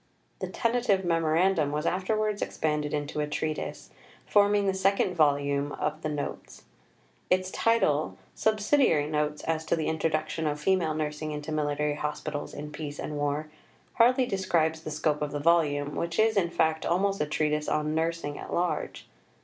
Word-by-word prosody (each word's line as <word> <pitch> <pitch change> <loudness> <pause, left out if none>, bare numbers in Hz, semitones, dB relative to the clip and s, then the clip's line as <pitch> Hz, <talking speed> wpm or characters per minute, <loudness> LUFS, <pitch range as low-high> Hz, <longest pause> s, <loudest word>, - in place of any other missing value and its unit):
" - - -40
The - - -2
tentative 230 -5 +1
memorandum 165 -1 +2
was 150 +2 -2
afterwards 210 +3 0
expanded 150 -1 -1
into 150 0 -3
a 150 - 0
treatise, 155 +1 -4 0.3
forming 205 0 +4
the 195 - +2
second 190 0 +2
volume 145 -3 +2
(pp. - - -6
184) - - +1
of 155 +1 -15
the 155 - -2
Notes. 150 -1 -5 0.7
Its 185 0 +1
title 155 -10 +1 0.2
Subsidiary 215 - +2
Notes 150 0 -1
as 160 -1 -1
to 155 - +1
the 160 -2 -2
Introduction 160 0 -1
of 150 0 -2
Female 170 -2 +1
Nursing 155 0 -3
into 150 +1 -5
Military 150 -1 0
Hospitals 150 0 -4
in 150 +1 -6
Peace 150 -1 -6
and 150 - -5
War 145 +1 -2 0.4
hardly 255 +2 +4
describes 170 -6 0
the 160 - -6
scope 150 0 0
of 150 -1 -2
the 145 - -3
volume, 145 -3 +2
which 170 0 -2
is, 220 0 +3
in 180 -4 +2
fact 160 -1 +1
almost 195 +2 +1
a 150 - 0
treatise 150 0 0
on 150 0 0
Nursing 160 -2 -2
at - - -8
large. 175 0 -2
155 Hz, 170 wpm, -28 LUFS, 150-185 Hz, 0.7 s, forming